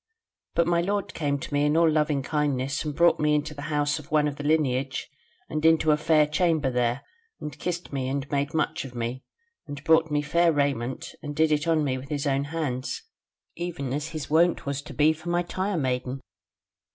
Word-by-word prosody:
But 170 - +3
my 170 0 +2
lord 200 +3 -2
came 145 -3 -1
to 140 - -7
me 145 0 +2
in 150 +2 +2
all 165 0 +5
loving 150 -3 +1
kindness 140 -2 -1
and 150 -2 -4
brought 170 +2 +4
me 150 0 +3
into 150 +1 -1
the 145 - -8
house 145 0 +1
of 150 - -13
one 150 -1 +3
of 145 -1 -4
the 145 - -6
Lineage, 140 -3 0 0.4
and 155 +1 -3
into 160 -1 +5
a - - +5
fair 150 0 +3
chamber 150 -2 +1
there, 125 +1 0 0.4
and 150 - -6
kissed 175 -3 -4
me, 130 -2 -1
and 140 +1 -2
made 145 +2 -1
much 155 - 0
of 130 -2 -10
me; 120 +2 -3 0.4
and 145 0 -7
brought 160 0 +4
me 145 0 0
fair 170 +3 +3
raiment 135 -4 -1
and 145 -2 -6
did 160 +1 +3
it 150 +1 +1
on 160 -2 +3
me 130 -2 -1
with 135 +2 -11
his 145 -1 -2
own 140 0 +1
hands, 145 - -3 0.5
even 160 -7 -4
as 145 +2 -2
his 155 -3 -5
wont 165 +1 +3
was 140 0 -2
to 145 0 -10
be 155 +3 +4
for 160 +2 -8
my 175 0 +1
tire 185 +2 -2
maiden. 130 -2 -1
150 Hz, 215 wpm, -26 LUFS, 140-160 Hz, 0.5 s, all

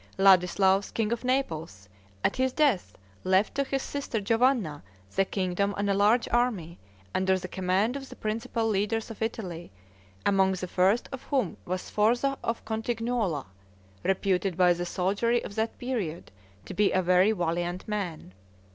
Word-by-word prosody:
Ladislaus, 190 +1 +4
king 220 -1 -1
of 235 +1 -2
Naples, 165 - -2 0.4
at - - +1
his 260 0 +2
death, 280 - +1 0.3
left 190 +2 +2
to 280 - +1
his 270 0 -2
sister 280 -5 -3
Giovanna 225 - +1 0.3
the 195 - +3
kingdom 190 +1 -1
and 200 0 +1
a - - +3
large 210 +5 +3
army, 215 -9 0 0.3
under 190 0 +2
the 185 0 -6
command 190 +6 0
of 270 -1 -6
the - - -10
principal 225 +1 -2
leaders 215 +2 0
of 225 - -10
Italy, 185 - -4 0.5
among 190 -1 +3
the 185 0 -4
first 190 +6 +2
of 265 -2 -6
whom 265 - 0
was 185 +1 -3
Sforza 240 +6 +1
of 230 0 -3
Cotignuola, 225 - -1 0.6
reputed 190 -1 0
by 180 -1 +5
the 175 0 -4
soldiery 205 +7 +1
of - - -7
that 220 +1 -2
period 215 -11 -4 0.3
to - - -7
be 205 -1 +3
a 185 - +2
very 180 +4 +4
valiant 175 -1 -2
man. 185 - -4
200 Hz, 155 wpm, -28 LUFS, 185-230 Hz, 0.6 s, by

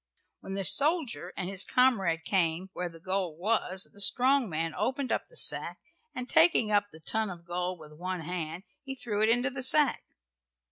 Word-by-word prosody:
When 195 - -7
the 195 -1 -2
soldier 280 - +3
and 180 - -3
his 195 0 0
comrade 195 -11 +2
came 180 0 -1
where 180 0 -4
the 165 -1 -14
gold 185 -2 -3
was 190 -1 0
the 200 - -8
strong 255 +4 +4
man 165 0 -3
opened 255 +6 -2
up - - -1
the - - -20
sack, - - +1 0.4
and 250 0 -5
taking 320 -10 +4
up 205 -1 +2
the 160 - -14
ton 220 +6 -1
of 170 -2 -10
gold 180 +1 -3
with 155 -2 -14
one 180 +2 -5
hand 165 +1 -5 0.2
he 270 -1 -7
threw 215 -5 -3
it 220 - +3
into 245 +4 +1
the 265 0 -6
sack. 280 +2 +3
195 Hz, 190 wpm, -29 LUFS, 175-250 Hz, 0.4 s, strong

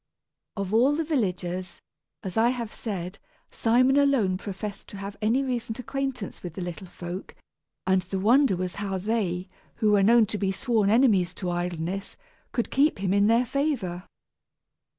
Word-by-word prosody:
Of 200 0 -3
all 255 +6 +4
the 325 - 0
villagers, 185 - -2 0.4
as 190 - -5
I 225 +2 +4
have 235 -3 -3
said, 190 -4 -5 0.3
Simon 255 +4 +3
alone 270 -10 +3
professed 200 0 -6
to 200 - -9
have 200 +1 -6
any 230 +6 +2
recent 240 -4 -3
acquaintance 265 -3 -4
with 175 -3 -7
the - - -5
little 175 +2 -6
folk, 175 +1 -7 0.5
and 190 0 +3
the 185 +2 -4
wonder 235 +3 +4
was 180 0 -4
how 195 -2 -2
they, 190 -3 -1 0.3
who 215 -1 +2
were 205 -1 +5
known 230 +3 +6
to 210 0 -4
be 195 -1 +1
sworn 215 0 +1
enemies 210 -7 +3
to 180 -2 -3
idleness, 175 +2 -3 0.3
could 235 - -2
keep 290 +3 +3
him 190 -1 0
in 200 0 +4
their 230 +3 +4
favor. 230 - -2
205 Hz, 165 wpm, -26 LUFS, 185-240 Hz, 0.5 s, known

